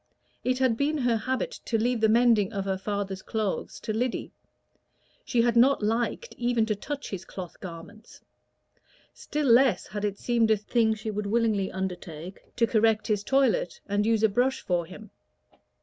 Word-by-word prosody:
It 255 0 +1
had 255 -3 +2
been 295 +3 +1
her 245 -4 +1
habit 260 - -2
to 230 - 0
leave 235 +1 0
the 220 - +4
mending 225 -3 +4
of 195 -3 -3
her 190 -1 -1
father's 195 -1 -3
clothes 215 -2 -3
to 215 - -3
Lyddy; 245 +3 -2 0.9
she 235 -2 +1
had 240 -1 +2
not 250 0 +4
liked 235 - -1
even 240 -2 +2
to 215 -1 -1
touch 285 +7 -6
his 190 -2 -5
cloth 185 -2 -9
garments; 185 +5 -11 0.9
still 300 0 -3
less 255 0 +4
had 205 +1 -6
it 205 -1 -1
seemed 235 -1 +1
a 220 - +4
thing 220 +1 +1
she 215 0 -5
would 210 0 -3
willingly 215 -3 +1
undertake 180 -2 -6
to 235 - +3
correct 220 -1 +2
his 210 -2 0
toilette, 265 -9 +1
and 205 +1 0
use 225 -1 +2
a - - +7
brush 250 +6 +1
for 175 -2 -1
him. 205 +3 -12
220 Hz, 175 wpm, -27 LUFS, 200-240 Hz, 0.9 s, a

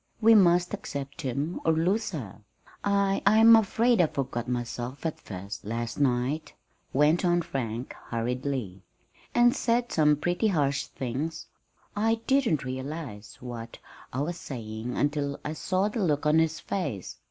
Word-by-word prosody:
We 225 0 +6
must 175 -3 +5
accept 140 -6 -5
him 140 +5 -2
or 160 - +3
lose 185 +8 +1
her. 110 - -7 0.4
I 200 -1 +2
I'm 220 +3 +8
afraid 225 +1 +3
I 170 - +4
forgot 125 -4 -3
myself 120 +3 -4
at 160 - -2
first, 100 +1 -7
last 115 +3 -4
night," 135 +3 0 0.4
went 150 +6 +3
on 175 -1 +2
Frank, 125 -6 -4
hurriedly, 120 -4 -3 0.5
"and 240 0 +5
said 240 +1 +1
some 150 -1 +4
pretty 175 +8 0
harsh 145 -7 +1
things. 140 +6 -4 0.5
I 225 +2 +2
didn't 260 - +2
realize 130 -4 -6
what 115 -2 -7 0.3
I 130 - -2
was 170 +4 -2
saying 115 -4 -6
until 145 -1 0
I 150 - -2
saw 185 +5 0
the 215 +2 -3
look 150 -4 +1
on 150 +1 +5
his 160 -1 +1
face. 115 - -4
150 Hz, 145 wpm, -27 LUFS, 125-185 Hz, 0.5 s, I'm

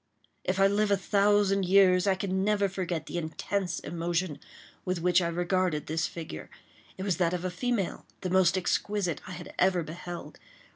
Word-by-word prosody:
If 185 +1 -1
I 195 - +6
live 205 +1 +2
a 200 - +3
thousand 200 0 +3
years, 185 0 +5
I 195 - +4
can 190 0 -1
never 205 -1 +2
forget 180 -4 -3
the 175 - -3
intense 175 +2 -2
emotion 170 -1 -2 0.4
with 185 -1 -1
which 180 +1 +3
I 170 - 0
regarded 175 -2 0
this 160 +1 -1
figure. 160 - -8 0.5
It 190 - -4
was 190 -4 0
that 175 -1 +1
of 180 +1 -4
a 185 - -1
female, 220 0 -2
the 185 - -3
most 190 0 +4
exquisite 185 -1 -1
I 185 - -6
had 175 0 -9
ever 180 -2 +3
beheld. 175 +2 -8
185 Hz, 180 wpm, -29 LUFS, 175-195 Hz, 0.5 s, I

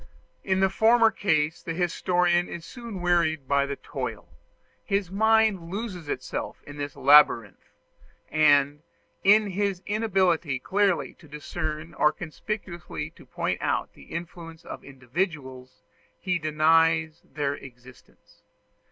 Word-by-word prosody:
In 190 -1 +1
the 190 - +4
former 225 +2 +5
case 155 -6 0
the 165 - -5
historian 175 0 +1
is 170 -1 -7
soon 230 -5 -8
wearied 170 -5 +1
by 140 0 +2
the 140 - -3
toil; - - -6 0.6
his 195 -2 -1
mind 220 -4 +2
loses 190 -6 -5
itself - - -5
in 145 0 -10
this 145 -1 -5
labyrinth; 140 -6 +4 0.6
and, 145 -1 +4 0.4
in 205 0 +5
his 195 -1 -1
inability 185 -9 +1
clearly 195 +5 0
to 160 - -16
discern 155 +2 -5
or 150 - +3
conspicuously 175 +1 -6
to - - -18
point - - -2
out - - -1
the - - -16
influence 165 -1 -8
of - - -8
individuals, 130 -1 -5 0.3
he 180 -2 -1
denies 160 +1 +2
their 145 -2 -3
existence. 130 -2 -15
165 Hz, 125 wpm, -26 LUFS, 150-190 Hz, 0.6 s, former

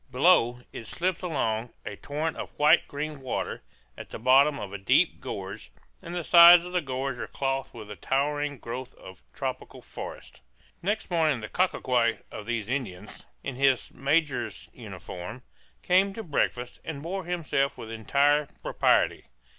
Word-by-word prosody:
Below, 125 -3 +3
it 115 - -8
slips 180 +5 -2
along, 120 -9 -2
a - - -5
torrent 150 +2 -3
of - - -8
white 150 +3 +5
green 150 +1 -5
water, 130 - -3 0.3
at - - -10
the - - -6
bottom 135 +5 +4
of 100 -1 -7
a 100 - -5
deep 95 - +3
gorge; 60 - -7 0.3
and 170 +1 -7
the 175 - -2
sides 170 +1 +9
of 180 - -7
the 180 - +2
gorge 130 -2 -3
are - - -4
clothed 135 -1 -2
with 105 -2 -9
a - - -6
towering 145 - -1
growth 125 +2 -7
of 95 -5 -13
tropical - - -5
forest. - - -9 0.4
Next 205 +2 -2
morning 155 -7 +2
the 110 - -7
cacique 125 -10 +1
of 105 - -8
these 115 -3 -2
Indians, 125 -8 -5 0.2
in 135 -3 -5
his 135 -2 +2
major's 135 - -1
uniform, 105 +8 -8 0.4
came 195 +2 +3
to 225 - -5
breakfast, 125 - -2
and 145 -3 -6
bore 185 +2 -4
himself 165 -6 -1
with 115 - -8
entire 140 +6 +2 0.2
propriety. - - +2
140 Hz, 160 wpm, -27 LUFS, 120-160 Hz, 0.4 s, sides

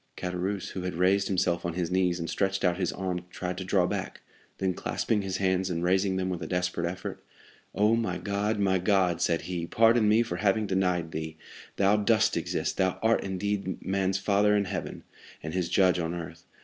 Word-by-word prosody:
Caderousse, 90 +2 -3
who 95 - -5
had 90 -1 -4
raised 95 +3 +2
himself 90 -2 0
on 85 - -2
his 90 -1 -2
knees, 90 -1 +2
and 85 - -3
stretched 95 +1 -1
out 90 -1 +2
his 90 - 0
arm, 90 -2 -3
tried 90 0 -4
to - - -4
draw 90 -1 +2
back, - - -4 0.4
then 95 -1 0
clasping 105 +4 -1
his 95 -1 -3
hands, 95 -1 +1
and 85 -1 -2
raising 95 +2 +2
them 95 0 -1
with 90 -2 -3
a 80 - -4
desperate 90 -1 -1
effort, 90 +1 -7 0.5
"Oh, 105 +2 +4
my 115 -1 -1
God, 105 +2 -1
my 95 -2 +2
God!" 90 -3 +2
said 85 -1 +1
he, 85 -2 -4
"pardon 115 +1 +4
me 110 +2 +5
for 100 -7 -4
having 105 +2 +2
denied 90 -4 0
thee; 80 0 -5 0.4
thou 100 +2 +3
dost 110 +1 +3
exist, - - -2
thou 95 -1 +1
art 115 +1 +3
indeed 95 0 -3
man's 95 0 0
father 100 +2 +3
in 100 -1 +2
heaven, - - -5 0.4
and 80 +1 -5
his 90 -2 -1
judge 90 -2 +3
on 85 0 -2
earth. 85 -2 -8
95 Hz, 200 wpm, -28 LUFS, 90-100 Hz, 0.5 s, me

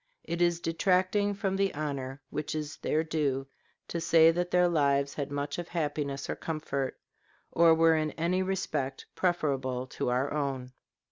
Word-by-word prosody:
It 170 +1 -3
is 175 -1 +3
detracting 185 +4 +1
from 195 -1 -1
the 195 0 +1
honor 140 -2 -4
which 150 +1 -3
is 150 0 -4
their 155 +1 0
due 145 -4 -1 0.4
to 170 - -3
say 165 0 +6
that 175 +1 -1
their 180 0 +4
lives 140 -4 +2
had 140 -2 -3
much 145 +3 -3
of 175 - -5
happiness 145 -4 -2
or - - -2
comfort, 140 -4 -3 0.5
or 165 -1 +6
were 165 0 +5
in 155 -1 +1
any 175 +3 0
respect 155 -8 -2
preferable 135 -8 0
to 130 - -3
our 130 +4 0
own. 135 -4 -2
155 Hz, 160 wpm, -29 LUFS, 140-175 Hz, 0.5 s, say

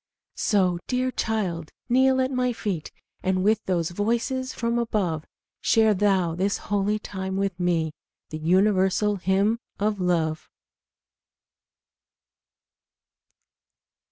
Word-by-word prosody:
So, 185 -5 +2
dear 255 0 0
my - - -5
child, 185 -10 -2 0.2
kneel 260 +1 +4
at 260 +1 0
my 250 -1 0
feet, 195 -8 -4 0.3
And 185 0 0
with 215 +2 +2
those 175 -3 0
voices 235 +7 -1
from 235 0 -1
above 185 -9 -1 0.3
Share 220 -1 +4
thou 190 -4 +2
this 195 +4 0
holy 205 +1 0
time 190 -2 -5
with 195 -2 -1
me, 165 -3 0 0.4
The 155 - -4
universal 190 +4 +2
hymn 195 +5 +1 0.2
of 205 0 0
love. 165 -3 0
200 Hz, 110 wpm, -25 LUFS, 180-220 Hz, 0.4 s, kneel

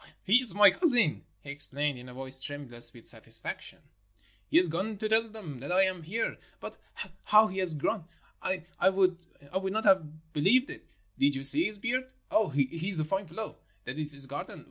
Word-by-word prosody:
"He 205 +5 +5
is 225 -8 +2
my 205 -1 +7
cousin," 245 - +1 0.2
he 140 - -7
explained 145 -1 -2
in 125 +1 -11
a - - -11
voice 130 0 -3
tremulous 120 -5 -2
with 115 -1 -15
satisfaction. - - -1 0.7
"He - - +3
has 180 - +7
gone 190 +7 -3
to 215 - -2
tell 220 +1 +2
them 185 - -9
that 140 +6 -6
I 185 +2 +4
am 185 -2 -1
here. 215 +8 -3 0.2
But - - -8 0.5
how 215 +1 +6
he 190 -2 -4
has 180 -4 +7
grown! 165 +5 -2 0.4
I 185 0 -2 0.3
would 185 -2 +1 0.4
not 215 +4 -2
have 160 -3 +1
be 145 - -2
lieved 255 - +3
it. - - -12 0.3
Did 140 0 +3
you 135 - -5
see 300 - +3
his 210 - -4
beard? 255 +4 -2 0.2
Ah, 215 -3 +2
he 140 -1 +2
is 165 +6 -4
a 155 - 0
fine 195 +4 -2
fellow. 210 +7 -7 0.2
That 130 +5 -6
is 150 -1 +4
his 140 -1 +2
garden 140 +2 -7
180 Hz, 200 wpm, -29 LUFS, 145-210 Hz, 0.7 s, my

